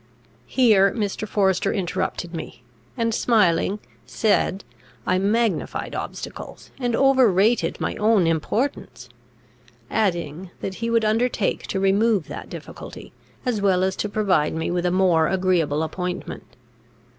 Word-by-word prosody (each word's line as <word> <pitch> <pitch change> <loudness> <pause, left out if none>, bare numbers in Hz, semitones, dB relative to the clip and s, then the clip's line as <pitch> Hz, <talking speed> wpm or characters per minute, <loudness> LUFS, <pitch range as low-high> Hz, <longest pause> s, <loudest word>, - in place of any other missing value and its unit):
Here 210 -7 +4
Mr. 215 -1 -3
Forester 195 -1 +1
interrupted 175 -1 -3
me, 125 -7 -7 0.3
and, 230 -1 0
smiling, 205 -4 +2 0.3
said, 205 - +1 0.4
I 185 - +2
magnified 210 -2 0
obstacles, - - -7
and 245 -3 0
over 265 -4 +4
rated 210 +6 +2
my - - -2
own 210 -4 +3
importance; 165 - -2 0.8
adding, 175 -4 -1
that 190 - -4
he 230 - -1
would 230 -1 +2
undertake 225 -1 0
to 190 - -2
remove 195 -1 +2
that - - -7
difficulty, - - -10 0.3
as 235 -5 0
well 185 -2 +3
as 190 0 0
to 210 - -2
provide 195 -8 +1
me 160 +1 -2
with 175 0 0
a - - +1
more 175 -4 +3
agreeable 175 -5 +1
appointment. 180 +2 -5
195 Hz, 130 wpm, -23 LUFS, 180-220 Hz, 0.8 s, Here